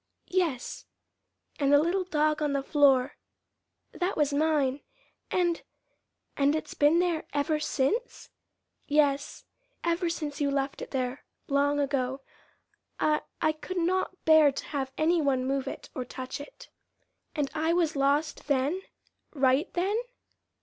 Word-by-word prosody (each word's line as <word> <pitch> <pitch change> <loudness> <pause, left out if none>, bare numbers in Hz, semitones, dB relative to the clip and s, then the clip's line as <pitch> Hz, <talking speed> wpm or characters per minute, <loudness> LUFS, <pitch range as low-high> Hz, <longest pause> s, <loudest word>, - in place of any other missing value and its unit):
"Yes." 340 -9 -1 0.7
"And 280 -1 +2
the 290 - +8
little 350 +5 +1
dog 305 -2 +1
on 295 -2 +1
the 275 -1 0
floor 275 -2 +3 0.7
that 360 +2 -2
was 295 -1 +2
mine, 290 -2 +1 0.5
and 345 -2 +1 0.7
and 285 +1 +3
it's 315 - -4
been 295 +3 +4
there 345 -2 0
ever 295 +2 +1
since?" 305 - -1 0.6
"Yes, 285 -1 +1 0.4
ever 340 +1 +1
since 300 -3 -4
you 285 - +2
left 275 0 -2
it - - -6
there 255 0 -3 0.2
long 285 +1 +2
ago. 270 -1 -1 0.8
I 305 0 +2 0.2
I 310 - +4
could 340 +4 -7
not 370 +2 -1
bear 315 -2 +7
to 275 - -6
have 270 -2 -2
any 330 +2 +3
one 265 -3 +1
move 270 0 -1
it, - - -7
or 255 - -3
touch 255 +3 -6
it." - - -12 0.7
"And 290 -2 -1
I 320 +1 +1
was 335 -3 +1
lost 285 +3 0
then 285 +6 +1 0.5
right 270 +4 +2
then?" 380 +4 +1
295 Hz, 140 wpm, -28 LUFS, 275-330 Hz, 0.8 s, the